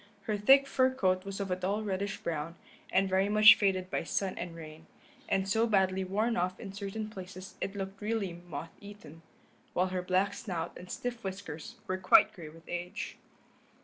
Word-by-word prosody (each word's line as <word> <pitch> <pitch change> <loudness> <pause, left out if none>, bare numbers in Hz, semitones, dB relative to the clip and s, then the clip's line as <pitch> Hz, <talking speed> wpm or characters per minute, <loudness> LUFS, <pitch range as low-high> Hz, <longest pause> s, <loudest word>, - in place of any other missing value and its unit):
Her 215 +1 -1
thick 270 +7 +6
fur 260 -1 +2
coat 185 -7 +1
was 195 0 -5
of 195 -2 -3
a - - +2
dull 195 +4 -1
reddish 200 0 -2
brown, 165 0 -3 0.4
and 195 +1 +3
very 190 +1 +2
much 215 +1 +9
faded 185 -2 0
by - - -1
sun 190 +3 -1
and 175 -1 -6
rain, 160 0 -11 0.4
and 195 0 +1
so 225 +3 +2
badly 190 -3 +2
worn 215 +5 0
off 185 +1 -1
in 195 -4 -7
certain 200 +2 -4
places 185 -2 -9
it 195 - -3
looked 195 0 -5
really 210 -4 -1
moth 170 -2 -8
eaten, 205 -6 -12 0.5
while 185 +1 +1
her 185 0 -2
black 185 +2 +1
snout 175 -5 -4
and 180 - -11
stiff 240 -1 -4
whiskers 190 -5 -6
were 185 0 -2
quite 185 - +6
gray 170 -6 -9
with 165 +2 -16
age. 175 0 -5
190 Hz, 185 wpm, -31 LUFS, 180-205 Hz, 0.5 s, much